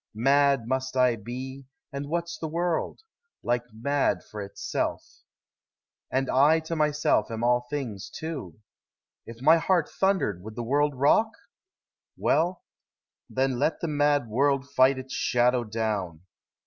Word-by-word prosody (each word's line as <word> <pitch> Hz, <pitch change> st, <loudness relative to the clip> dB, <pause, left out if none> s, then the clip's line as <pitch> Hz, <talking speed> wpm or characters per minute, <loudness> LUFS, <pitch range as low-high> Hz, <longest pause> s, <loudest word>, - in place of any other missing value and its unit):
Mad 135 Hz, 0 st, +3 dB
must 130 Hz, +1 st, -2 dB
1 125 Hz, -3 st, +2 dB
be, 130 Hz, +4 st, -7 dB, 0.3 s
and 140 Hz, +1 st, -5 dB
what 170 Hz, +1 st, -1 dB
's 170 Hz, -, -7 dB
the 160 Hz, -, -3 dB
world? 170 Hz, -, -2 dB, 0.4 s
Like 120 Hz, 0 st, -1 dB
mad 135 Hz, +6 st, 0 dB
For 105 Hz, -, -8 dB
itself. 100 Hz, 0 st, -3 dB, 1.0 s
And 135 Hz, +1 st, 0 dB
I 145 Hz, +5 st, +4 dB
to 160 Hz, +1 st, -4 dB
myself 150 Hz, -7 st, +1 dB
am 115 Hz, 0 st, -4 dB
all 120 Hz, 0 st, +2 dB
things, 120 Hz, -9 st, -4 dB
too. 145 Hz, -, -6 dB, 0.7 s
If 115 Hz, +2 st, -10 dB
my 160 Hz, +3 st, +7 dB
heart 170 Hz, -1 st, +1 dB
thundered 190 Hz, -, 0 dB
would 110 Hz, +3 st, -9 dB
the 120 Hz, -, -4 dB
world 145 Hz, +4 st, +1 dB
rock? 145 Hz, -, +3 dB, 0.9 s
Well, 175 Hz, +3 st, +1 dB, 0.7 s
Then 130 Hz, -1 st, 0 dB
let 155 Hz, +3 st, +1 dB
the 170 Hz, -, -1 dB
mad 145 Hz, -3 st, +2 dB
world 135 Hz, +4 st, +1 dB
fight 135 Hz, -1 st, +4 dB
its 130 Hz, 0 st, -7 dB
shadow 125 Hz, 0 st, +2 dB
down. 105 Hz, -7 st, -3 dB
135 Hz, 140 wpm, -26 LUFS, 120-150 Hz, 1.0 s, my